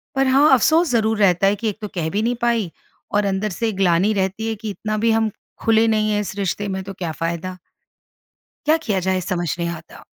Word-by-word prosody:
पर 270 0 +2
हाँ 275 +3 +5
अफ़सोस 320 +5 +4
ज़रूर 220 -2 +1
रहता 195 -1 +4
है 200 - +3
कि 220 +2 -2
एक 205 - -6
तो 210 - -4
कह 160 -2 -1
भी 205 +4 0
नहीं 245 +1 0
पाई 230 -7 +1 0.4
और 205 - +2
अंदर 195 +2 -1
से 230 -1 +1
ग्लानि 190 +2 +2
रहती 195 +2 -1
है 225 - -2
कि 220 +1 -6
इतना 215 +2 -3
भी 225 +2 +2
हम, 220 -1 +1 0.3
खुले 225 0 +4
नहीं 215 -1 +1
है 210 - +1
इस 200 - -6
रिश्ते 200 +1 -2
में, 190 0 -3
तो 195 +1 -7
क्या 175 -3 -4
फ़ायदा? 170 +3 -4 1.1
क्या 310 +2 +5
किया 200 -7 0
जाए? 185 0 0
समझ 175 -3 -2
नहीं 170 0 -1
आता। 165 -1 -9
205 Hz, 225 wpm, -21 LUFS, 185-225 Hz, 1.1 s, हाँ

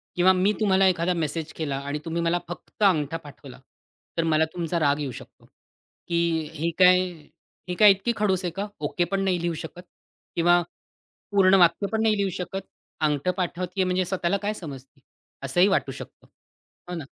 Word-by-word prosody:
किंवा 180 +1 +5
मी 185 +2 +2
तुम्हाला 195 -3 +4
एखादा 180 0 +1
मेसेज 160 -1 -3
केला 145 -4 -3
आणि 145 +1 -3
तुम्ही 165 +1 -2
मला 170 +1 +1
फक्त 175 +4 -7
अंगठा 165 -5 +2
पाठवला. 145 -4 -13 0.6
तर 165 - +2
मला 160 -1 +2
तुमचा 170 -1 -2
राग 145 -1 +2
येऊ 140 -3 -3
शकतो, - - -13 0.6
की 170 - -2 0.4
"ही 160 +2 -1
काय 180 0 +7 0.7
ही 180 - -2
काय 210 -2 +9
इतकी 195 +5 0
खडूस 190 -3 +1
आहे 175 - -1
का? 200 +2 -3
ओके 175 - -1
पण 195 0 0
नाही 185 -3 0
लिहू 170 0 -1
शकत 175 +2 -9 0.5
किंवा 175 +1 +4 0.7
पूर्ण 195 -1 +5
वाक्य 175 +3 +4
पण 220 0 0
नाही 215 -1 +3
लिहू 200 -1 0
शकत. 190 +2 -4 0.4
अंगठा 150 +3 +1
पाठवतीये 180 +1 -2
म्हणजे 185 0 0
स्वतःला 185 +1 0
काय 210 - 0
समजती?" 135 -7 -10 0.4
असंही 175 +8 +3
वाटू 195 - +1
शकतं. - - -11 0.6
हो 180 - -4
ना? 160 -5 -6
175 Hz, 175 wpm, -25 LUFS, 160-190 Hz, 0.7 s, काय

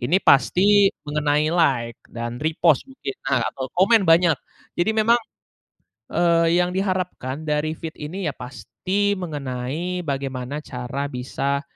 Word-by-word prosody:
ini 140 +10 +2
pasti 195 +8 +5 0.2
mengenai 150 +1 +1
like, 125 -9 +1
dan 120 0 -5
repost 160 -1 +2
mungkin, 255 - -6
nah, 130 -2 +2
atau 130 -1 -6
komen 205 +3 +5
banyak. 165 -1 +5 0.4
Jadi 175 +5 +2
memang, 230 +2 +4 0.9
eee, 170 0 +3
yang 180 0 +1
diharapkan 180 -7 -2
dari 150 +1 0
feed 160 0 -7
ini, 170 +5 -5
ya - - -10
pasti 190 +10 -2
mengenai 150 +2 -4
bagaimana 135 0 -3
cara 125 +2 -4
bisa 140 +2 -2
155 Hz, 130 wpm, -22 LUFS, 135-180 Hz, 0.9 s, pasti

